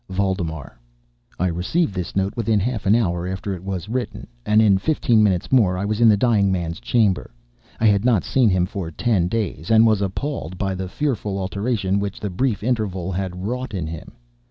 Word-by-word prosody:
VALDEMAR 90 -9 -3 0.6
I 90 - +1
received 95 - 0
this 90 -2 -5
note 95 +1 0
within 110 -2 +1
half 110 -1 -2
an 105 - +5
hour 90 -6 0
after 95 +2 -4
it 90 -1 -8
was 95 -2 -4
written, 125 +3 -4 0.2
and 105 +1 +4
in 100 -3 +4
fifteen 120 -2 +2
minutes 95 -4 +1
more 105 -9 +4
I 100 - -2
was 105 +2 -1
in 115 - +7
the 105 - +5
dying 100 -4 +3
man's 85 -3 -2
chamber. 100 - +1 0.5
I 115 - +1
had 100 -1 +4
not 120 -6 +3
seen 125 -4 +2
him 90 -2 +2
for 95 -3 -5
ten 95 +1 0
days, 95 -6 -3
and 110 0 +6
was 110 -3 +3
appalled 100 - -3
by 95 0 -1
the 95 0 -5
fearful 105 -6 -2
alteration 100 0 -1
which 100 0 -4
the 105 - -4
brief 105 +3 -1
interval 100 -7 -1
had 90 0 -4
wrought 125 0 -3
in 90 -4 -2
him. 80 0 -8
100 Hz, 200 wpm, -22 LUFS, 90-110 Hz, 0.6 s, in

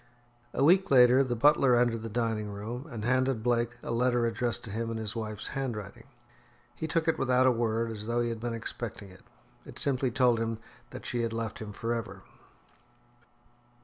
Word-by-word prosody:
A - - +2
week 185 +6 +5
later 125 0 +6
the 125 -2 -2
butler 130 0 +5
entered 120 -2 +2
the 115 - -5
dining 110 -2 -1
room, 115 +8 -6
and 115 -5 -5
handed 130 -2 +1
Blake 120 -1 0
a - - -4
letter 120 0 +2
addressed 120 +1 -1
to 110 - -7
him 115 +2 -3
in 115 - -3
his 110 0 -4
wife's 110 -2 -4
handwriting. 115 -4 -5 0.7
He 140 +6 -4
took 160 +1 0
it 165 - +1
without 130 0 +3
a 130 - +6
word, 115 -1 0
as 105 -1 -7
though 120 +1 0
he 120 - 0
had 115 -1 -4
been 120 0 -3
expecting 110 -2 -6
it. 95 0 -16 0.4
It - - -12
simply 130 -2 +1
told 120 -1 +3
him 115 0 -2 0.3
that - - -9
she 120 - -2
had 115 -1 -2
left 115 -2 -4
him 110 -1 -6
for 115 +3 -2
ever. 115 -2 -5
120 Hz, 195 wpm, -29 LUFS, 115-125 Hz, 0.7 s, later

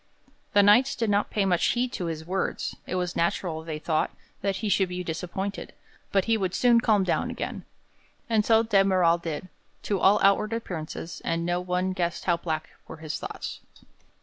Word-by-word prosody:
The 205 -1 +6
Knights 240 +7 +5
did 225 -3 0
not 205 +1 +1
pay 205 -2 0
much 180 -3 +2
heed 245 +1 +1
to 180 - -3
his 160 -1 -5
words; 190 +2 -2
it - - -3
was 180 -1 -2
natural, 170 -1 -1
they 160 -2 -4
thought, 155 0 0 0.3
that 195 -1 0
he 200 +3 -3
should 195 -2 +2
be 180 0 -4
disappointed, 180 +4 -4 0.4
but 195 -2 +2
he 230 -1 +2
would 190 -3 -2
soon 240 -2 +4
calm 215 -4 +3
down 180 - 0
again. - - -5 0.6
And 220 -2 +2
so 225 +1 +4
de 205 -4 +4
Merall 180 -3 +3
did, 165 +1 -4 0.4
to 200 -2 -1
all 200 +3 +5
outward 200 +3 +3
appearance, 170 -6 -5
and 165 0 -1
no 175 0 0
one 180 +1 -1
guessed 175 -2 -2
how 175 -2 +3
black 160 -2 -4 0.2
were - - -9
his 155 -1 -5
thoughts. - - -6
185 Hz, 190 wpm, -26 LUFS, 170-205 Hz, 0.6 s, The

